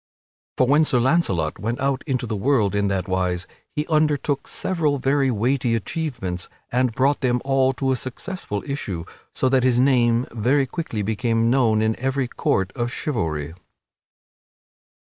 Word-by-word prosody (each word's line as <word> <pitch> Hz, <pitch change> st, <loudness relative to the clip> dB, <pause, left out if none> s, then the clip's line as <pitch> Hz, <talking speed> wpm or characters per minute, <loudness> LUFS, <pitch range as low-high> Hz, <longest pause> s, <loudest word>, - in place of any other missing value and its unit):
For 130 Hz, -, +4 dB
when 145 Hz, +5 st, +4 dB
Sir 130 Hz, -5 st, +2 dB
Launcelot 120 Hz, -, +1 dB
went 115 Hz, +3 st, -2 dB
out 135 Hz, 0 st, 0 dB
into 130 Hz, -3 st, -1 dB
the 110 Hz, -2 st, -3 dB
world 105 Hz, -2 st, +2 dB
in 100 Hz, 0 st, +1 dB
that 95 Hz, -1 st, -1 dB
wise 90 Hz, -1 st, -1 dB, 0.3 s
he 150 Hz, -, -2 dB
undertook 150 Hz, -3 st, +1 dB
several 155 Hz, -6 st, 0 dB
very 135 Hz, +1 st, +2 dB
weighty 120 Hz, +1 st, +1 dB
achievements 115 Hz, -, -4 dB, 0.2 s
and 125 Hz, 0 st, +2 dB
brought 140 Hz, +3 st, +2 dB
them 125 Hz, -2 st, +2 dB
all 135 Hz, -1 st, +3 dB
to 135 Hz, +1 st, -1 dB
a -, -, +2 dB
successful 130 Hz, -, -5 dB
issue, 100 Hz, -, -4 dB, 0.3 s
so 130 Hz, -, +1 dB
that 130 Hz, 0 st, +3 dB
his 125 Hz, -1 st, +3 dB
name 125 Hz, -2 st, +3 dB
very 125 Hz, +5 st, +2 dB
quickly 130 Hz, -7 st, -4 dB
became 115 Hz, +2 st, +1 dB
known 115 Hz, -5 st, +3 dB
in 110 Hz, 0 st, +1 dB
every 135 Hz, 0 st, 0 dB
court 95 Hz, -5 st, 0 dB
of 120 Hz, -1 st, -2 dB
chivalry. 80 Hz, -, -2 dB
125 Hz, 155 wpm, -23 LUFS, 110-140 Hz, 0.3 s, For